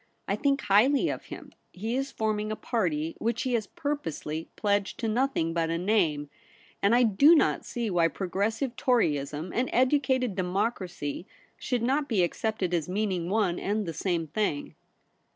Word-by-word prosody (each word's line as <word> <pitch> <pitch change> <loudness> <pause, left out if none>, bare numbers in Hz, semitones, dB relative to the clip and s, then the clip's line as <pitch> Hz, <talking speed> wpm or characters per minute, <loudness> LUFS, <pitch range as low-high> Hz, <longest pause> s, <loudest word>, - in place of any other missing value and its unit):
I - - +1
think 275 -1 +1
highly 235 +8 +4
of - - -4
him. - - -10 0.2
He 220 +6 -3
Is 270 +1 -2
forming 215 -1 -1
a - - -1
party 165 -10 -1
which 230 0 -1
he 255 - -1
has 220 -4 0
purposely 165 - -4
pledged 205 -2 0
to 230 - 0
nothing 220 -8 0
but 165 -1 0
a 165 - 0
name; 170 -6 +1 0.5
and 200 +4 +4
I 245 - +5
do 275 - +6
not - - +2
see 235 -2 -3
why 170 -2 +3
Progressive 205 - -2
Toryism 155 - 0
and 250 +2 0
Educated 260 -2 +2
Democracy 185 -3 -2 0.3
should 245 -3 -2
not 280 +4 +1
be 205 -7 +3
accepted 190 0 -1
as 170 -1 0
meaning 185 -3 -1
one 195 -4 +1
and 210 +1 -1
the 165 - -4
same 170 0 -1
thln^.' 160 -4 -2
210 Hz, 165 wpm, -28 LUFS, 175-240 Hz, 0.5 s, do